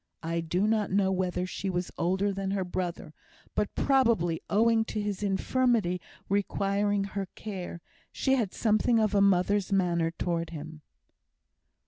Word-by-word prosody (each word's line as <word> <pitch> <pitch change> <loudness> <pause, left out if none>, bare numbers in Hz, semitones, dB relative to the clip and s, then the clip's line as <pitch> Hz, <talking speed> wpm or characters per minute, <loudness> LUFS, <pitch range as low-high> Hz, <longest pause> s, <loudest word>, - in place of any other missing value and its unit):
I 165 +1 -1
do 175 +4 0
not 215 -1 +1
know 190 0 +2
whether 180 -1 -1
she 190 +1 -4
was 180 -1 -2
older 190 +3 0
than 195 0 -3
her 195 -1 0
brother, 175 -3 -4 0.4
but, 210 -1 -1
probably 230 - +2
owing 225 +1 +4
to 215 - -4
his 205 -2 -3
infirmity 205 -2 +1 0.3
requiring 200 0 +1
her 195 0 -4
care, 185 -5 -6 0.3
she 265 - +1
had 230 -8 +1
something 220 +1 +2
of 215 -2 +2
a 200 - +4
mother's 200 +1 +3
manner 175 -4 +2
towards 170 0 -3
him. 155 0 -8
195 Hz, 145 wpm, -29 LUFS, 180-210 Hz, 0.4 s, owing